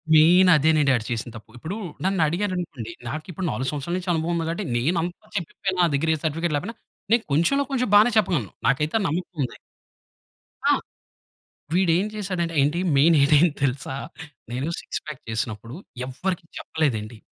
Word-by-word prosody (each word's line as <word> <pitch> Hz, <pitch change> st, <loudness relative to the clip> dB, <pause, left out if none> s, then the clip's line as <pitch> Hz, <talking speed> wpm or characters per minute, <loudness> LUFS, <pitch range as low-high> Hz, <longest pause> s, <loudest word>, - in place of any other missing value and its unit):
Main 175 Hz, +4 st, +7 dB
అదేనండి 150 Hz, -2 st, +4 dB
ఆడు 115 Hz, -2 st, -2 dB
చేసిన 120 Hz, +1 st, -2 dB
తప్పు. 110 Hz, -, -11 dB
ఇప్పుడు 160 Hz, +10 st, -5 dB, 0.3 s
నన్నఅడిగారనుకోండి 175 Hz, -, -1 dB, 0.2 s
నాకిప్పుడు 165 Hz, -, -5 dB
4 130 Hz, 0 st, -2 dB
సంవత్సరాల 150 Hz, +4 st, -3 dB
నుంచి 185 Hz, 0 st, -5 dB
అనుభవం 165 Hz, +1 st, 0 dB
ఉంది 165 Hz, -1 st, -1 dB
గాబట్టి 170 Hz, +5 st, -3 dB
నేనంత 165 Hz, +7 st, 0 dB, 0.2 s
చెప్పకపోయిన 185 Hz, +2 st, -3 dB
నా 175 Hz, -, +5 dB
దగ్గర 160 Hz, +3 st, 0 dB
ఏ -, -, -5 dB
సర్టిఫికేట్ 160 Hz, +1 st, -1 dB
లేకపోయినా 205 Hz, +11 st, -4 dB, 0.3 s
నేను 230 Hz, 0 st, +4 dB
కొంచెంలో 170 Hz, -, +3 dB
కొంచెం 250 Hz, -3 st, +1 dB
బానే 210 Hz, +3 st, +7 dB
చెప్పగలను. 175 Hz, -, +1 dB, 0.2 s
నాకైతే 150 Hz, -, +1 dB
ఆ -, -, -1 dB
నమ్మకం 175 Hz, +4 st, -3 dB
ఉంది. 120 Hz, -, -5 dB, 1.1 s
ఆ! -, -, +6 dB, 1.0 s
వీడేం 180 Hz, +1 st, +3 dB
చేసాడంటే 180 Hz, -5 st, -2 dB
ఏంటి 150 Hz, +5 st, +1 dB, 0.2 s
మెయిన్ 155 Hz, +4 st, +5 dB
ఇడేంటి 150 Hz, +2 st, +4 dB
తెలుసా 135 Hz, 0 st, -1 dB, 0.6 s
నేను 130 Hz, +5 st, -2 dB
సిక్స్ -, -, -5 dB
పాక్ 150 Hz, -4 st, -7 dB
చేసినప్పుడు 110 Hz, +2 st, -3 dB, 0.3 s
ఎవరికీ 165 Hz, +7 st, -3 dB
చెప్పలేదండి. 120 Hz, -8 st, -2 dB
160 Hz, 150 wpm, -24 LUFS, 140-180 Hz, 1.1 s, మెయిన్